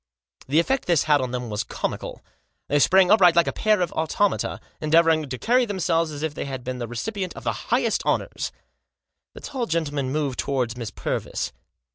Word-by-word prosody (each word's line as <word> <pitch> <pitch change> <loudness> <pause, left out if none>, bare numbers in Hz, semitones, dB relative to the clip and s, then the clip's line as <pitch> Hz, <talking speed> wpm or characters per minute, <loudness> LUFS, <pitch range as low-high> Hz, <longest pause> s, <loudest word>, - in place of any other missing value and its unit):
The 145 +5 +3
effect 265 +10 0
this 170 -4 +3
had 150 -2 +3
on 130 - -2
them 125 -2 -4
was 105 0 -1
comical. - - -5 0.5
They 145 - +3
sprang 190 +5 +5
upright 180 -5 +6
like 170 -1 +5
a - - -1
pair 215 -3 +2
of 175 - 0
automata, 175 +5 0 0.2
endeavouring 160 -1 +3
to 130 - -4
carry 250 - +3
themselves 170 -5 0
as 150 0 -6
if 160 -2 -1
they - - -4
had 130 -2 -5
been 125 0 -4
the 120 - -3
recipient 185 - -4
of - - -9
the - - -4
highest - - +1
honours. - - -1 0.8
The - - -10
tall 260 -5 -3
gentleman 145 -5 -1
moved 140 -4 -2
towards 125 -4 -1
Miss 115 -3 -5
Purvis. - - -3
155 Hz, 190 wpm, -24 LUFS, 130-180 Hz, 0.8 s, upright